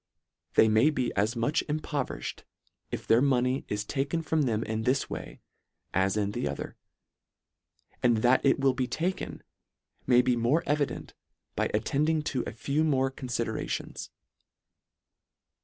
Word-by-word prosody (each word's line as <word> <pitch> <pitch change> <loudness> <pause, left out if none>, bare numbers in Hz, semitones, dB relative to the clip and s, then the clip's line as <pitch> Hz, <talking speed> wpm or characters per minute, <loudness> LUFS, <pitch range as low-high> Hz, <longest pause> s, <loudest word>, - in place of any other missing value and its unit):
They 110 - +7
may 110 +7 +5
be 130 -5 -1
as 105 +5 +1
much 120 +5 +1
impoverished 145 - -3 0.5
if - - -5
their 115 +2 +5
money 130 -1 +2
is 105 0 -2
taken 140 +7 -1
from 160 0 +1
them 110 0 0
in 110 0 -2
this 130 +4 0
way, - - -7 0.5
as 95 +2 +2
in 100 -1 0
the 90 - -2
other; 70 - -5 1.3
and 120 -2 +4
that 125 +1 +4
it 140 - +3
will 135 -1 +3
be 130 -1 -1
taken, 180 +7 -3 0.6
may 125 -1 +6
be 125 -1 +2
more 120 +8 +2
evi 145 -1 +1
dent, - - -8 0.4
by - - 0
attending 150 +8 +1
to 125 - 0
a - - -3
few 140 +7 -1
more 135 -4 +2
confidera 130 -3 -3
tions. - - -4
130 Hz, 150 wpm, -28 LUFS, 110-145 Hz, 1.3 s, They